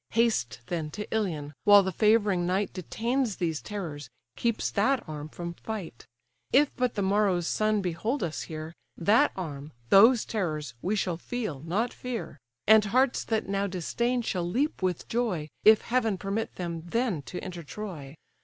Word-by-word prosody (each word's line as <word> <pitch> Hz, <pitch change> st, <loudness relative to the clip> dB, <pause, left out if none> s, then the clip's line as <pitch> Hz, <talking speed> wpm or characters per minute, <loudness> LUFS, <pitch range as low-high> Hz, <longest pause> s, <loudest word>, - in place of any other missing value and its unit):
Haste 120 Hz, -, +1 dB
then 160 Hz, 0 st, -3 dB
to 210 Hz, -, -4 dB
Ilion, 160 Hz, -9 st, -2 dB
while 205 Hz, -1 st, +8 dB
the 190 Hz, -, -1 dB
favouring 205 Hz, -3 st, +3 dB
night 190 Hz, +2 st, 0 dB
Detains 230 Hz, -, -1 dB
these 165 Hz, -4 st, -2 dB
terrors, 155 Hz, -10 st, -6 dB, 0.3 s
keeps 235 Hz, -2 st, 0 dB
that 250 Hz, +5 st, +1 dB
arm 150 Hz, -1 st, -6 dB
from 170 Hz, +1 st, -6 dB
fight. 185 Hz, -, -7 dB, 0.4 s
If 285 Hz, +2 st, +4 dB
but 250 Hz, -1 st, 0 dB
the 200 Hz, -, 0 dB
morrow's 190 Hz, -3 st, +2 dB
sun 215 Hz, -1 st, +1 dB
behold 200 Hz, -, -1 dB
us 160 Hz, -3 st, -3 dB
here, 155 Hz, 0 st, -6 dB, 0.2 s
That 220 Hz, -, +4 dB
arm, 150 Hz, -5 st, -6 dB, 0.2 s
those 225 Hz, +4 st, +7 dB
terrors, 155 Hz, -, -2 dB
we 195 Hz, +4 st, 0 dB
shall 180 Hz, -5 st, -1 dB
feel, 215 Hz, -, -4 dB
not 190 Hz, -, -1 dB
fear; 240 Hz, -, -5 dB, 0.3 s
And 220 Hz, 0 st, +7 dB
hearts 255 Hz, +5 st, +2 dB
that 220 Hz, -3 st, -1 dB
now 200 Hz, 0 st, 0 dB
disdain, 235 Hz, +7 st, -1 dB
shall 175 Hz, -5 st, -2 dB
leap 275 Hz, -, 0 dB
with 185 Hz, -3 st, -1 dB
joy, 210 Hz, -11 st, -1 dB
If 215 Hz, 0 st, +7 dB
heaven 225 Hz, -5 st, 0 dB
permit 200 Hz, +4 st, -3 dB
them 170 Hz, -2 st, -4 dB
then 225 Hz, -, 0 dB
to 180 Hz, -, -6 dB
enter 175 Hz, -2 st, -6 dB
Troy. 155 Hz, -3 st, -7 dB
195 Hz, 165 wpm, -28 LUFS, 170-225 Hz, 0.4 s, while